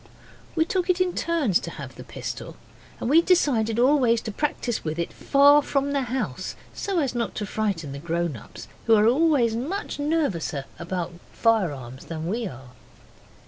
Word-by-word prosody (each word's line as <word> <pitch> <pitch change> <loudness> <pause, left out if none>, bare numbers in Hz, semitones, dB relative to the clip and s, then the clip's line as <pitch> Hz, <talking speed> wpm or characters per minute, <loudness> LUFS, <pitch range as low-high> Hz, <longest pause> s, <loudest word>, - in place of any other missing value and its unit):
We 320 -1 +3
took 370 +1 -1
it 365 0 +3
in 365 -1 +2
turns 310 - +1
to - - -6
have - - -8
the - - -10
pistol, - - -7 0.4
and - - -3
we 310 +6 +6
decided 245 -12 +2
always 250 -2 +4
to 220 - -5
practise 240 -1 -2
with 155 0 -3
it 170 - -3
far 285 +1 +5
from 280 0 0
the 280 -1 +1
house, 240 - -3 0.2
so 390 -2 -2
as 275 -6 +1
not 240 -1 -2
to 210 - -2
frighten 195 -8 -2
the 140 - -6
grown 170 -1 -1
ups, 110 - -11 0.2
who 225 - +7
are 210 0 +4
always 255 -2 +3
much 295 - -3
nervouser 280 - -1
about 175 0 -3 0.2
firearms 145 - 0
than 160 -1 -5
we 220 +5 -1
are. 130 -5 -10
230 Hz, 175 wpm, -25 LUFS, -, 0.4 s, who